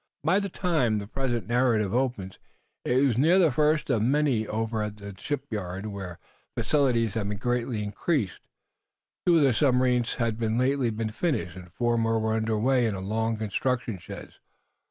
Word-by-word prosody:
By 170 +6 +3
the 200 -1 -3
time 155 - +1
the 100 - -4
present 120 +1 -2
narrative 115 -4 +1
opens 120 -7 -2 0.4
it 130 +3 +2
was 125 -4 +1
near 165 +7 +5
the 170 -5 +4
first 150 +2 +2
of 115 -4 +2
May. 130 -3 +2
Over 110 0 -2
at 105 0 -4
the 100 -1 -8
shipyard, 105 -7 -4
where 95 -5 -6 0.4
facilities 120 -8 +2
had 105 -3 -2
been 105 - -3
greatly 120 -1 -1
increased, 105 - -1 0.9
two 175 -1 +6
of 155 - +4
the 135 -3 +4
submarines 125 -2 +2
had 115 -2 -1
lately 125 +3 +1
been 110 0 -3
finished, 110 - -2
and 90 -1 -11
four 120 +3 0
more 115 0 +1
were 110 0 0
under 110 0 0
way 125 +2 +2
in 105 - -2
long 110 +4 -1
construction 110 0 -2
sheds. - - -10
115 Hz, 170 wpm, -27 LUFS, 105-135 Hz, 0.9 s, two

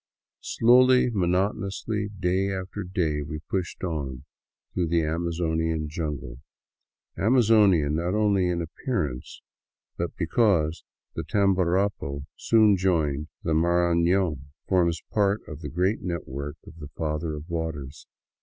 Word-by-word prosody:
Slowly, 125 +1 +4
monotonously, 100 +2 -1
day 95 +2 +1
after 95 +2 -5
day, 85 -5 -1
we 75 +1 -5
pushed 90 +4 -4
on 70 -8 -4 0.5
through 90 -2 0
the 85 0 +2
Amazonian 80 -1 -1
jungle 75 -6 -5 0.4
— - - -48
Amazonian 105 - +4
not 85 +4 -1
only 100 -4 +2
in 85 -1 -1
appearance, 80 - -4 0.5
but 85 0 -3
because 85 -3 +1 0.3
the - - -4
Tamborapo, 95 -7 +1
soon 110 -3 +4
to - - -8
join 75 -6 +1 0.2
the 80 - 0
Marafion, 85 -1 +2 0.2
forms 85 -3 +1
a - - -29
part 100 0 +1
of - - -8
the - - -5
great 90 +6 0
network 75 -5 -5
of 80 - -13
the 75 -2 -8
Father 75 0 -2
of 75 +2 -8
Waters. 80 -5 -5
85 Hz, 125 wpm, -26 LUFS, 80-100 Hz, 0.5 s, Slowly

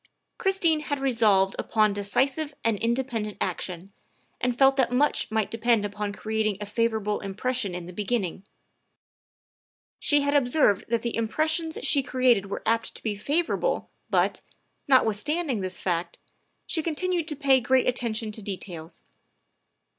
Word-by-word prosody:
Christine 365 -5 +2
had 290 -2 -3
resolved 220 -7 +3
upon 215 -2 +2
decisive 265 +9 -1
and 230 -1 +2
independent 230 -2 -1
action, 185 +1 -4 0.5
and 245 -1 -1
felt 270 +1 +5
that 255 -3 +2
much 285 +4 +1
might 220 -1 -1
depend 230 -2 +2
upon 205 0 -3
creating 215 -1 -1
a 210 - -4
favorable 215 -1 0
impression 200 0 -2
in 180 -1 -6
the 180 - -9
beginning; 200 -2 -2 1.6
she 290 -1 +3
had 285 0 0
observed 250 -7 +3
that 230 0 0
the 235 - -2
impressions 315 +8 0
she 285 -5 +3
created 250 -6 +2
were 195 - -5
apt 230 0 0
to - - -10
be 215 -2 -1
favorable, 325 - -1 0.2
but, - - +1 0.5
notwithstanding 260 - +2
this 185 -1 -5
fact, 170 -1 -2 0.5
she 320 - 0
continued 340 +1 -1
to 305 - -1
pay 275 -2 +4
great 255 +1 +2
attention 230 -3 -1
to 215 - -4
details. 180 -4 -6
230 Hz, 140 wpm, -26 LUFS, 205-275 Hz, 1.6 s, felt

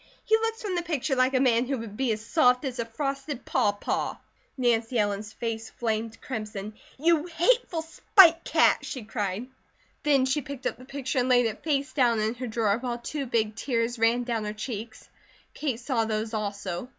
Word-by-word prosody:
He 440 - +4
looks 450 +1 -1
from 405 -3 -2
the 350 - 0
picture 310 -5 -1
like 255 +1 +2
a - - +4
man 245 -2 +3
who 275 0 -1
would 225 -3 -7
be 260 0 0
as 215 0 -3
soft 250 -2 +3
as 255 -2 -4
a 235 - 0
frosted 275 +2 -4
pawpaw." 205 0 0 0.4
Nancy 240 -1 +1
Ellen's 205 0 -1
face 225 0 -4
flamed 225 -1 -3
crimson. 215 -4 -5 0.2
"You 330 +2 +2
hateful 350 0 +1
spite 335 +1 +5
cat!" - - +4
she 255 -5 -6
cried. 210 0 -3 0.6
Then 280 -4 +3
she 270 +3 0
picked 280 -1 -8
up - - -1
the 255 - -12
picture 270 -1 -2
and 250 +1 +1
laid 245 -1 +5
it 220 -1 -3
face 285 -3 0
down 240 -5 +3
in 215 +1 0
her 250 +1 -5
drawer, 220 -2 +1
while 245 -1 -3
two 275 +3 -4
big 220 -3 0
tears 235 -1 -1
ran 230 +2 +3
down 235 -3 -2
her 210 - -3
cheeks. 220 0 -6 0.5
Kate 265 -7 -2
saw 240 -2 0
those 220 0 -2
also. 200 -1 -3
245 Hz, 190 wpm, -27 LUFS, 220-275 Hz, 0.6 s, spite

